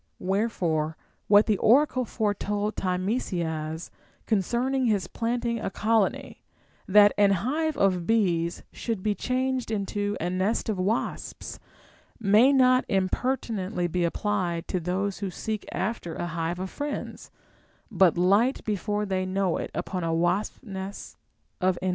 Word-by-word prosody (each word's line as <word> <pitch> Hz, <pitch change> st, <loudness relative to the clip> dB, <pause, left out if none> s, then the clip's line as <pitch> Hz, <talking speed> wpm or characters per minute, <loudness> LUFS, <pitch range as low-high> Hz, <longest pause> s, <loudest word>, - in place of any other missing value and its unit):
Wherefore 180 Hz, -6 st, -1 dB, 0.3 s
what 205 Hz, +1 st, +6 dB
the 210 Hz, -3 st, +1 dB
oracle 255 Hz, +2 st, +4 dB
foretold 210 Hz, -1 st, -1 dB
Timesias 175 Hz, -5 st, -2 dB, 0.3 s
concerning 240 Hz, +5 st, +1 dB
his 205 Hz, -4 st, +1 dB
planting 235 Hz, 0 st, -2 dB
a -, -, -3 dB
colony, 215 Hz, +1 st, 0 dB, 0.5 s
that 205 Hz, +1 st, +7 dB
an 205 Hz, -1 st, +6 dB, 0.2 s
hive 310 Hz, +3 st, 0 dB
of 185 Hz, -3 st, +1 dB
bees 175 Hz, -7 st, +1 dB
should 225 Hz, -5 st, -4 dB
be 210 Hz, -, +2 dB
changed 255 Hz, +2 st, -1 dB
into 205 Hz, -1 st, -2 dB
a 170 Hz, -, -1 dB
nest 190 Hz, +5 st, 0 dB
of 210 Hz, -, -1 dB
Avasps, 205 Hz, +6 st, -3 dB, 0.6 s
may 220 Hz, +5 st, +5 dB
not 255 Hz, -2 st, +5 dB
impertinently 195 Hz, -1 st, -1 dB
be 175 Hz, +1 st, 0 dB
applied 175 Hz, -1 st, -1 dB
to 185 Hz, -, 0 dB
those 190 Hz, +3 st, -2 dB
who 200 Hz, -2 st, -3 dB
seek 215 Hz, +3 st, -4 dB
after 190 Hz, -5 st, -3 dB
a -, -, -3 dB
hive 170 Hz, +1 st, -3 dB
of 185 Hz, +1 st, -5 dB
friends, 290 Hz, 0 st, -5 dB, 0.6 s
but 180 Hz, -3 st, +4 dB
light 200 Hz, +9 st, +3 dB
before 210 Hz, 0 st, -1 dB
they 190 Hz, -2 st, -1 dB
knoAV 185 Hz, -2 st, 0 dB
it -, -, -12 dB
upon 185 Hz, -2 st, -3 dB
a 165 Hz, -, 0 dB
wasps 175 Hz, +9 st, 0 dB
nest 195 Hz, -3 st, -7 dB, 0.5 s
of 185 Hz, -1 st, +2 dB
enemies. 185 Hz, -, -1 dB
200 Hz, 135 wpm, -26 LUFS, 180-225 Hz, 0.6 s, that